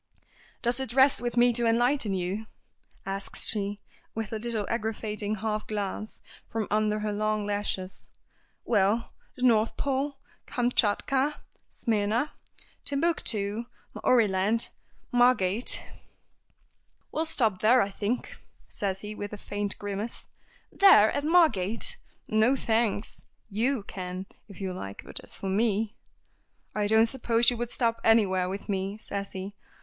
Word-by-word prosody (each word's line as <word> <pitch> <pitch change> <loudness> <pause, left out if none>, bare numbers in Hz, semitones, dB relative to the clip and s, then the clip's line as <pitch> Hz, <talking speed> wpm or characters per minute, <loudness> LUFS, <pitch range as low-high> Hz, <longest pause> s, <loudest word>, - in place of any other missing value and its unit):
"Does 240 +1 +2
it 265 -3 -4
rest 265 -1 +5
with 240 0 -3
me 240 0 +5
to 235 0 +1
enlighten 235 -2 +2
you?" 190 +4 -3 0.6
asks 195 0 -2
she, 205 -1 0 0.4
with 225 -1 -3
a 220 - -2
little 225 -2 -2
aggravating 215 -2 -2
half 215 0 -3
glance 210 0 -4 0.3
from 225 -2 -2
under 215 0 +1
her 210 -1 -1
long 215 0 0
lashes; 205 -2 -3 0.6
"well 215 +1 +2 0.2
the 250 - -6
North 230 -3 +3
Pole, 275 +1 -1 0.3
Kamtschatka, 250 +4 +1 0.3
Smyrna, 225 +5 0 0.5
Timbuctoo, 235 -8 0 0.3
Maoriland, 215 -1 +2 0.4
Margate 245 -3 +3 0.6
" - - -42
"We'll 320 +1 -1
stop 225 -11 +1
there, 240 +2 +5
I 200 - -4
think," 215 +5 -3 0.3
says 195 -1 -3
he, 210 0 -6
with 205 0 -6
a - - -5
faint 205 0 -1
grimace. 205 +3 -4 0.5
"There! 300 - +7
At 285 - -2
Margate? 310 - +3 0.3
No, 220 +5 +3
thanks. 225 -4 -1 0.3
You 230 +3 0
can, 185 -1 -6 0.2
if 200 - -13
you 190 -2 -3
like, 100 - -7
but - - -6
as - - -10
for - - -8
me 215 +2 +1 0.4
" - - -42 0.3
"I 210 -1 0
don't 220 +1 +5
suppose 235 -1 +3
you 245 - -3
would 240 0 -3
stop 230 -2 0
anywhere 190 -5 +3
with 195 +2 -5
me," 195 0 -2
says 200 -2 -5
he. 190 +1 -6
215 Hz, 135 wpm, -28 LUFS, 205-240 Hz, 0.6 s, There